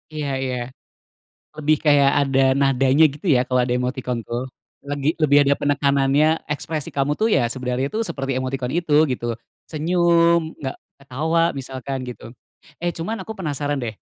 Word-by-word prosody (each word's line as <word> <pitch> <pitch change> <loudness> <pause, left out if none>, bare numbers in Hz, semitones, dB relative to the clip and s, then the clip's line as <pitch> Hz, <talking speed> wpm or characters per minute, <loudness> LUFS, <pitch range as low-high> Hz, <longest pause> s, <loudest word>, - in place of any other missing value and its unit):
Iya 145 -2 -3
iya. 130 -1 -2 1.0
Lebih 155 0 +2
kayak 140 -2 +5 0.2
ada 135 0 +2
nadanya 135 +2 +3
gitu 150 +6 -10
ya - - +3
kalo 125 -1 +2
ada 125 - -2
emotikon 125 -2 -3
tuh. 120 +2 -4 0.4
Lebih 145 +2 -1
lebih 145 -1 +5
ada 140 +1 +3
penekanannya, 140 +2 +2
ekspresi 150 0 -3
kamu 140 +1 0
tuh 220 - +3
ya 125 - +3
sebenarnya 130 +1 -2
tuh 220 - -1
seperti 135 -1 -3
emotikon 130 -1 -3
itu, 165 -3 +1 0.2
gitu. 120 -1 -3 0.3
Senyum, 170 0 +2
nggak 130 -2 -5 0.3
ketawa, 160 +6 0
misalkan 130 0 -5
gitu. 115 0 -9 0.5
Eh 175 - -1
cuman 190 +6 -4
aku 220 +4 -7
penasaran 145 -4 -2
deh, 110 -2 -3
140 Hz, 155 wpm, -21 LUFS, 130-155 Hz, 1.0 s, kayak